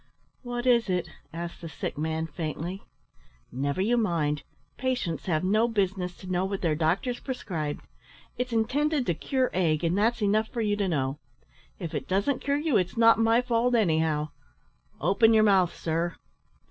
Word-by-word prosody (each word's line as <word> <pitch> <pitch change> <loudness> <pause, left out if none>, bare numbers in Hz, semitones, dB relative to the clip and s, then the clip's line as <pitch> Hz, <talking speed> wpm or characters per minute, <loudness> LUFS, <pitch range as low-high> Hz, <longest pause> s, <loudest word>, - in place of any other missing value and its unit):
"What 245 -1 -4
is 235 -4 +4
it?" 180 -1 -1 0.2
asked 170 +1 -6
the 165 - -6
sick 150 - -5
man, 160 +2 -2
faintly. 165 +4 -5 0.7
"Never 140 +6 -1
you 240 +4 +2
mind; 160 -9 0 0.3
patients 250 -12 -2
have 155 -2 +1
no 215 +5 +3
business 190 -5 -1
to - - -12
know 180 0 +1
what 195 0 -3
their 165 -3 +2
doctors 175 - 0
prescribe. 175 - -4 0.5
It's 250 +1 -3
intended 265 +5 +1
to 175 - +1
cure 260 - -1
ague, 165 -3 +1
and 170 +1 +1
that's 225 +3 +1
enough 215 +2 +2
for 235 - -4
you 205 -2 +1
to 205 -1 0
know. 140 -4 -1 0.6
If 170 -5 -6
it - - -3
doesn't 200 +9 0
cure 280 0 +1
you 295 -4 +2
it's 185 +3 -1
not 230 0 +6
my 225 +2 +4
fault, 245 0 +2
anyhow 160 -7 +1 0.7
open 225 +3 +4
your 215 - +6
mouth, 190 -4 +3
sir!" 165 +1 -2
195 Hz, 170 wpm, -27 LUFS, 165-235 Hz, 0.7 s, not